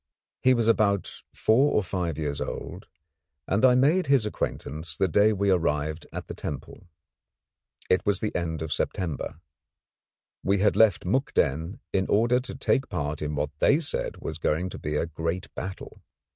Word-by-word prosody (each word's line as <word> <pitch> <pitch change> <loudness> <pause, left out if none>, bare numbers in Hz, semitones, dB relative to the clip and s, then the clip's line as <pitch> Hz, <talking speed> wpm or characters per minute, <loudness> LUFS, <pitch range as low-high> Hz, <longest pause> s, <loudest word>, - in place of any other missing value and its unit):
He 130 0 +5
was 115 -2 +1
about 100 -4 +1
four 130 +7 +3
or 105 - +2
five 90 -5 -2
years 75 -2 -2
old, - - -6 0.6
and 100 +5 +1
I 125 -1 +7
made 150 +9 +3
his 135 -5 +4
acquaintance 80 -6 -4
the 95 - +2
day 105 +5 +4
we 100 -1 +1
arrived 80 -2 0
at - - -6
the - - -7
temple. 70 -3 -7 1.0
It 90 -1 +2
was 100 -2 +2
at 105 - -1
the - - 0
end 80 -2 -3
of 80 - -2
September. 80 -3 -3 1.0
We 100 +1 +2
had 105 +2 +3
left 110 -6 +4
Mukden 90 - 0
in 95 0 +1
order 120 +4 +3
to 130 0 -7
take 135 0 +1
part 75 -3 -3
in 75 0 -2
what 75 +1 -1
they 145 - +4
said 160 - -3
was 80 +1 -6
going 80 +4 0
to - - -8
be 75 0 -3
a 75 - +1
great 85 +2 -4
battle. 95 0 -7
95 Hz, 170 wpm, -26 LUFS, 80-110 Hz, 1.0 s, I